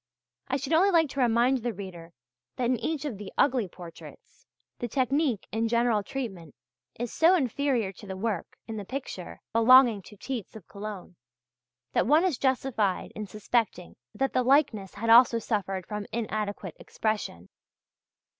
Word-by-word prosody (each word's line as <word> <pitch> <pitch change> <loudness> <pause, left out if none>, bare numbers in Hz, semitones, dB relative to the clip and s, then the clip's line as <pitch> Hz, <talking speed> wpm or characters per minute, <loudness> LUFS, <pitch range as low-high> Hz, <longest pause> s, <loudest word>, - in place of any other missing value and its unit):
I 270 - 0
should 275 +3 -3
only 365 +5 +5
like 330 -5 +3
to 275 - -5
remind 245 +2 +3
the 240 0 -3
reader 175 -4 -9 0.4
that 250 - -1
in 250 +1 +2
each 310 -2 -2
of 235 -9 -4
the 205 - -8
"ugly" 250 -7 +3
portraits, 170 -1 -13 0.3
the 240 - -2
technique 260 -1 0
and 225 +1 0
general 235 -2 +2
treatment 195 - -6 0.4
is 240 -1 -3
so 335 +3 +5
inferior 260 - 0
to 200 +2 -13
the 190 -1 -5
work 210 -3 -3
in 225 -1 -5
the 205 - -4
picture 205 -5 -7
belonging 235 -1 +6
to 210 +2 -15
Tietz 240 -2 -5
of 210 -6 -11
Cologne, 200 -4 -8 0.8
that - - +2
one 305 +5 +5
is 335 -10 0
justified 250 -7 0
in 215 -1 -5
suspecting 210 -2 -2 0.2
that 270 +1 0
the 255 - +3
likeness 250 -7 +2
has 225 +2 0
also 235 0 +7
suffered 195 -5 -2
from 210 0 -5
inadequate 210 -5 -3
expression. 210 - -3
230 Hz, 160 wpm, -28 LUFS, 200-260 Hz, 0.8 s, also